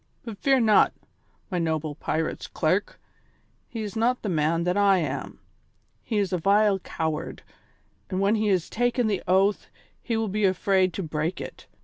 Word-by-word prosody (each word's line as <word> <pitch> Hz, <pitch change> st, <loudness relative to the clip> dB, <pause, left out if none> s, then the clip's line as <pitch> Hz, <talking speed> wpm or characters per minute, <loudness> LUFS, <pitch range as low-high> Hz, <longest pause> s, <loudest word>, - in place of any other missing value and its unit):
But 225 Hz, -4 st, -7 dB
fear 270 Hz, -1 st, +3 dB
not, 220 Hz, -3 st, +4 dB, 0.6 s
my 180 Hz, -, 0 dB
noble 160 Hz, -2 st, -1 dB
pirate's 160 Hz, +2 st, -3 dB
clerk; -, -, -1 dB, 0.7 s
he 225 Hz, -2 st, -5 dB
is 210 Hz, +1 st, -6 dB
not 240 Hz, +3 st, +1 dB
the 210 Hz, -, -2 dB
man 165 Hz, 0 st, +1 dB
that 180 Hz, +1 st, 0 dB
I 200 Hz, -1 st, +4 dB
am; 170 Hz, -, -3 dB, 0.7 s
he 220 Hz, -, -2 dB
is 195 Hz, -2 st, 0 dB
a 180 Hz, -, +1 dB
vile 200 Hz, +2 st, +3 dB
coward, 160 Hz, -2 st, -4 dB, 0.7 s
and 185 Hz, -, -2 dB
when 200 Hz, +2 st, +3 dB
he 215 Hz, -1 st, +1 dB
has 185 Hz, -4 st, +1 dB
taken 245 Hz, +1 st, 0 dB
the 205 Hz, -4 st, 0 dB
oath 195 Hz, +2 st, +2 dB, 0.3 s
he 230 Hz, -2 st, -2 dB
will 225 Hz, 0 st, 0 dB
be 210 Hz, +2 st, -2 dB
afraid 190 Hz, 0 st, +2 dB
to 195 Hz, -, -4 dB
break 155 Hz, +2 st, -2 dB
it. -, -, -9 dB
195 Hz, 170 wpm, -25 LUFS, 170-215 Hz, 0.7 s, not